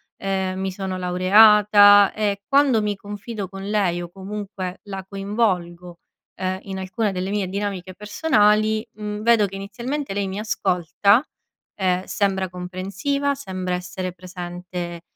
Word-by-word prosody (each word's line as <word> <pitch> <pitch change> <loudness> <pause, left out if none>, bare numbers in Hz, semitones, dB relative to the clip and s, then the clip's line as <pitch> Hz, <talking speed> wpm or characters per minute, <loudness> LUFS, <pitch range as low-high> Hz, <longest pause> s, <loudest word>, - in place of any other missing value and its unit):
ehm, 190 -1 -2
mi 190 0 -2
sono 190 0 -4
laureata 205 +2 +6
e 205 -2 -1
quando 275 -5 +4
mi 210 -1 -1
confido 205 0 -7
con 195 +1 -7
lei 190 -5 +1
o 175 - -7
comunque 195 0 -6
la 195 -2 -6
coinvolgo, 185 -4 -2 0.4
ehm, 185 0 -2
in 195 -1 -6
alcune 190 +3 -1
delle 185 0 -3
mie 200 -2 -1
dinamiche 195 -2 -4
personali, 210 - +2
mhmm, 210 0 -5
vedo 225 -2 +4
che 195 - -9
inizialmente 235 +7 -4
lei 200 0 -1
mi 190 +2 -4
ascolta, 200 +1 +2 0.5
ehm, 185 -1 0
sembra 190 -2 0
comprensiva, 190 +11 -2
sembra 185 -9 -4
essere 180 0 -5
presente 175 -1 -7
195 Hz, 135 wpm, -22 LUFS, 185-210 Hz, 0.5 s, laureata